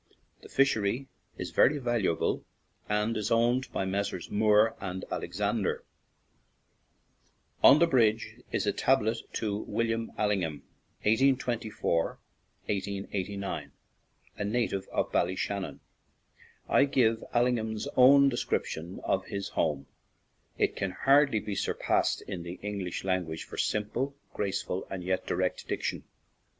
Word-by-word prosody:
The -, -, -13 dB
fishery 130 Hz, -1 st, +1 dB, 0.3 s
is -, -, -5 dB
very 145 Hz, +3 st, +4 dB
valuable, 120 Hz, -, 0 dB, 0.5 s
and 105 Hz, +2 st, +1 dB
is 105 Hz, -1 st, -1 dB
owned 120 Hz, +3 st, +2 dB
by 95 Hz, -, -1 dB
Messrs. 95 Hz, -1 st, -3 dB
Moore 105 Hz, +1 st, +4 dB
& -, -, -20 dB, 0.3 s
Alexander. 100 Hz, +3 st, -1 dB, 1.8 s
On 140 Hz, -, +9 dB
the 170 Hz, -, +5 dB
bridge 115 Hz, -7 st, +2 dB
is -, -, 0 dB
a -, -, +1 dB
tablet 115 Hz, -4 st, +2 dB
to 105 Hz, -3 st, -1 dB
William 115 Hz, 0 st, -2 dB
Allingham 95 Hz, -8 st, 0 dB, 0.4 s
(1824 115 Hz, -7 st, +1 dB, 0.6 s
1889), 100 Hz, 0 st, -3 dB, 0.7 s
a -, -, 0 dB
native 105 Hz, -2 st, -1 dB
of -, -, -1 dB
Bal 85 Hz, -, +3 dB
lyshannon. 95 Hz, +1 st, -3 dB, 0.9 s
I -, -, +5 dB
give 115 Hz, -5 st, +2 dB
Allingham's 120 Hz, -1 st, 0 dB
own 140 Hz, +2 st, +7 dB
de 120 Hz, -, -3 dB
scription 85 Hz, -3 st, -2 dB
of 95 Hz, 0 st, 0 dB
his 100 Hz, -1 st, -4 dB
home; 75 Hz, -4 st, -1 dB, 0.7 s
it -, -, +1 dB
can 100 Hz, -, -1 dB, 0.2 s
hardly 140 Hz, -4 st, +5 dB
be 105 Hz, -, -5 dB
surpassed -, -, 0 dB
in 90 Hz, -, -5 dB
the 85 Hz, +1 st, -6 dB
English 100 Hz, -4 st, -4 dB
language 90 Hz, -4 st, -1 dB
for -, -, -10 dB
sim 105 Hz, -1 st, +1 dB
ple, 135 Hz, +3 st, -2 dB, 0.2 s
graceful, 95 Hz, -2 st, -2 dB
and 95 Hz, -2 st, -5 dB
yet 95 Hz, +1 st, -1 dB
direct -, -, -1 dB
diction. -, -, -3 dB
105 Hz, 125 wpm, -29 LUFS, 95-120 Hz, 1.8 s, On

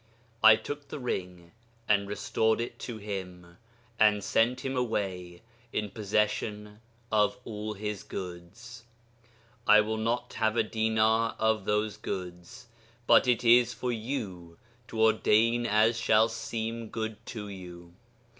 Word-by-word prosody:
I 110 Hz, 0 st, +10 dB
took 145 Hz, +6 st, -7 dB
the 140 Hz, -, -6 dB
ring 90 Hz, -9 st, -5 dB, 0.4 s
and 100 Hz, -1 st, +2 dB
restored 110 Hz, +2 st, 0 dB
it 120 Hz, -, -5 dB
to 120 Hz, -3 st, -6 dB
him, 90 Hz, -4 st, -7 dB, 0.4 s
and 105 Hz, -2 st, +4 dB
sent 125 Hz, +3 st, +1 dB
him 135 Hz, 0 st, -2 dB
away 95 Hz, -7 st, -3 dB, 0.3 s
in 105 Hz, -1 st, -3 dB
possession 105 Hz, 0 st, -2 dB, 0.3 s
of 110 Hz, +3 st, +2 dB
all 105 Hz, -1 st, -5 dB
his 105 Hz, -1 st, -5 dB
goods.... 95 Hz, +7 st, -9 dB, 0.8 s
I 105 Hz, -, +8 dB
will 110 Hz, +1 st, -2 dB
not 115 Hz, +2 st, -2 dB
have 110 Hz, 0 st, 0 dB
a 115 Hz, -, +4 dB
dinar 110 Hz, +1 st, +1 dB
of 110 Hz, -3 st, +1 dB
those 105 Hz, 0 st, 0 dB
goods, 90 Hz, +3 st, -7 dB, 0.4 s
but -, -, +5 dB
it 125 Hz, -1 st, +2 dB
is 120 Hz, +1 st, +5 dB
for 125 Hz, +2 st, -2 dB
you 110 Hz, -8 st, -5 dB, 0.3 s
to 110 Hz, -, -6 dB
ordain 110 Hz, +2 st, +3 dB
as 110 Hz, +2 st, +3 dB
shall 110 Hz, 0 st, +4 dB
seem 115 Hz, 0 st, -4 dB
good 110 Hz, -1 st, -5 dB
to 110 Hz, -4 st, -6 dB
you.... 90 Hz, -3 st, -10 dB
110 Hz, 135 wpm, -29 LUFS, 100-115 Hz, 0.8 s, I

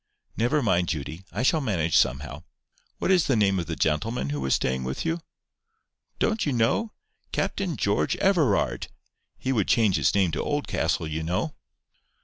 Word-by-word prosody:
"Never 130 Hz, +6 st, +1 dB
mind, 90 Hz, -5 st, +2 dB
Judy. 80 Hz, +4 st, -4 dB
I 110 Hz, -, -2 dB
shall 155 Hz, +4 st, +3 dB
manage 85 Hz, -, 0 dB
somehow.—What 65 Hz, -, -2 dB
is 180 Hz, -3 st, +4 dB
the 135 Hz, -, +3 dB
name 100 Hz, -3 st, +2 dB
of 85 Hz, -, -4 dB
the 80 Hz, -, -3 dB
gentleman 75 Hz, -, 0 dB
who 75 Hz, -1 st, -3 dB
was 65 Hz, 0 st, +2 dB
staying 65 Hz, 0 st, -1 dB
with 65 Hz, -, -4 dB
you?" 165 Hz, +1 st, 0 dB, 1.0 s
"Don't 220 Hz, -1 st, +1 dB
you 145 Hz, -, 0 dB
know? 125 Hz, -, +1 dB, 0.4 s
Captain 180 Hz, -8 st, -1 dB
George 100 Hz, 0 st, +1 dB
Everard. 135 Hz, -, +2 dB, 0.5 s
He 130 Hz, -, -2 dB
would 110 Hz, -7 st, +1 dB
change 110 Hz, -6 st, +3 dB
his -, -, +2 dB
name 95 Hz, -4 st, +3 dB
to -, -, -2 dB
Oldcastle, 85 Hz, -, -1 dB
you 80 Hz, +1 st, -3 dB
know." 90 Hz, -, -2 dB
100 Hz, 160 wpm, -26 LUFS, -, 1.0 s, is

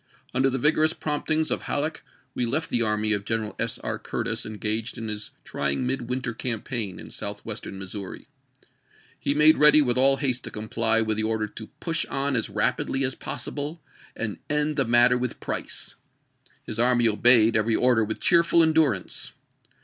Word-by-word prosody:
Under 135 Hz, +1 st, +2 dB
the 135 Hz, -, -1 dB
vigorous 155 Hz, +3 st, +3 dB
promptings 155 Hz, +1 st, -1 dB
of -, -, +1 dB
Halleck 150 Hz, +2 st, -2 dB, 0.3 s
we 120 Hz, -, -1 dB
left 155 Hz, +7 st, -2 dB
the 120 Hz, -, +2 dB
army 110 Hz, -1 st, +1 dB
of 100 Hz, -1 st, -1 dB
Greneral 110 Hz, -1 st, -3 dB
S. -, -, -1 dB
R. -, -, -4 dB
Curtis -, -, -3 dB
engaged 110 Hz, +1 st, -2 dB
in 115 Hz, -1 st, -5 dB
his 105 Hz, 0 st, -4 dB
try 70 Hz, -, -3 dB
ing 125 Hz, -, -2 dB
midwinter 125 Hz, -1 st, -3 dB
campaign 115 Hz, -4 st, -3 dB
in -, -, -10 dB
Southwestern 105 Hz, 0 st, -5 dB
Missouri. 95 Hz, 0 st, -8 dB, 0.9 s
He 140 Hz, -, -1 dB
made 155 Hz, +1 st, +6 dB
ready 150 Hz, 0 st, +7 dB
with 125 Hz, -4 st, +2 dB
all 135 Hz, +1 st, +5 dB
haste 130 Hz, -4 st, 0 dB
to -, -, -5 dB
comply 115 Hz, +1 st, 0 dB
with 110 Hz, -1 st, -1 dB
the 110 Hz, -, +1 dB
order 110 Hz, 0 st, -1 dB
to 110 Hz, +1 st, -10 dB
" -, -, -45 dB
push 165 Hz, -1 st, -1 dB
on 140 Hz, 0 st, -1 dB
as 115 Hz, -, 0 dB
rapidly 135 Hz, 0 st, -1 dB
as 130 Hz, 0 st, +1 dB
possible 150 Hz, +5 st, -5 dB, 0.3 s
and 110 Hz, -3 st, -4 dB
end 150 Hz, +1 st, 0 dB
the 135 Hz, -2 st, +1 dB
matter 120 Hz, +1 st, +4 dB
with 125 Hz, -1 st, -4 dB
Price." -, -, -4 dB, 0.7 s
His 110 Hz, -, -6 dB
army 120 Hz, -1 st, +3 dB
obeyed 115 Hz, +1 st, +5 dB
every 110 Hz, +1 st, +2 dB
order 125 Hz, -3 st, +3 dB
with 110 Hz, +1 st, -4 dB
cheerful 170 Hz, -1 st, +4 dB
endurance. 155 Hz, -, +1 dB
120 Hz, 175 wpm, -25 LUFS, 110-140 Hz, 0.9 s, ready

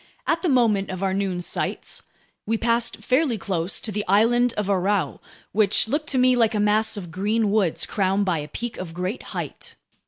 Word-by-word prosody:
At 330 Hz, 0 st, +1 dB
the 360 Hz, -, 0 dB
moment 225 Hz, -7 st, +2 dB
of 185 Hz, 0 st, -4 dB
our 190 Hz, -1 st, +1 dB
noon 190 Hz, -2 st, -1 dB
sights, -, -, -4 dB, 0.5 s
we 225 Hz, +1 st, +1 dB
passed 235 Hz, +1 st, +1 dB
fairly 260 Hz, -2 st, +2 dB
close 185 Hz, -3 st, -2 dB
to 220 Hz, -, -5 dB
the 210 Hz, 0 st, -2 dB
island 235 Hz, +5 st, +4 dB
of 210 Hz, -, -2 dB
Aurou, 195 Hz, 0 st, 0 dB, 0.3 s
which 210 Hz, +1 st, +3 dB
looked 295 Hz, +5 st, -1 dB
to 265 Hz, -, 0 dB
me 255 Hz, 0 st, +5 dB
like 230 Hz, -2 st, +2 dB
a -, -, +1 dB
mass 215 Hz, +1 st, +2 dB
of 175 Hz, -4 st, -7 dB
green 205 Hz, +4 st, 0 dB
woods 200 Hz, -6 st, +1 dB
crowned 195 Hz, 0 st, 0 dB
by 175 Hz, -4 st, 0 dB
a 150 Hz, -, -5 dB
peak 235 Hz, +9 st, -5 dB
of 170 Hz, -3 st, -7 dB
great 185 Hz, +6 st, -3 dB, 0.2 s
height. -, -, -6 dB
210 Hz, 195 wpm, -24 LUFS, 190-235 Hz, 0.5 s, me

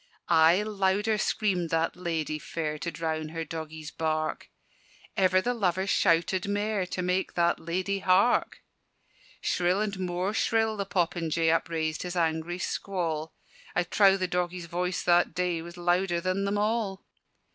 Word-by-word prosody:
Aye 165 Hz, +5 st, +5 dB
louder 210 Hz, +1 st, +1 dB
screamed 185 Hz, -5 st, 0 dB
that 165 Hz, 0 st, 0 dB
ladye 160 Hz, -4 st, -2 dB
fair 155 Hz, -1 st, -4 dB
To 170 Hz, -, -3 dB
drown 155 Hz, -1 st, -3 dB
her 165 Hz, 0 st, -4 dB
doggie's 155 Hz, -1 st, -7 dB
bark: 155 Hz, -1 st, -2 dB, 0.7 s
Ever 185 Hz, -2 st, +3 dB
the 245 Hz, -, +1 dB
lover 190 Hz, -5 st, 0 dB
shouted 180 Hz, 0 st, +2 dB
mair 205 Hz, -1 st, -1 dB
To 180 Hz, -, -3 dB
make 180 Hz, +1 st, -1 dB
that 170 Hz, 0 st, +2 dB
ladye 185 Hz, +4 st, -2 dB
hark: 190 Hz, +5 st, +2 dB, 0.8 s
Shrill 180 Hz, +2 st, +1 dB
and 205 Hz, -3 st, -2 dB
more 180 Hz, +2 st, -1 dB
shrill 225 Hz, -1 st, +1 dB
the 200 Hz, -2 st, -3 dB
popinjay 165 Hz, -3 st, +1 dB
Upraised 160 Hz, -1 st, -1 dB
his 180 Hz, 0 st, -4 dB
angry 165 Hz, 0 st, 0 dB
squall: 165 Hz, -5 st, -3 dB, 0.4 s
I 180 Hz, -, +3 dB
trow 195 Hz, +2 st, +4 dB
the 185 Hz, -1 st, -1 dB
doggie's 180 Hz, 0 st, -2 dB
voice 180 Hz, +1 st, -2 dB
that 175 Hz, 0 st, +3 dB
day 180 Hz, -2 st, 0 dB
Was 170 Hz, +1 st, -10 dB
louder 175 Hz, 0 st, +1 dB
than 185 Hz, +3 st, -1 dB
them 200 Hz, +1 st, 0 dB
all! 210 Hz, -2 st, -1 dB
180 Hz, 145 wpm, -28 LUFS, 165-195 Hz, 0.8 s, Aye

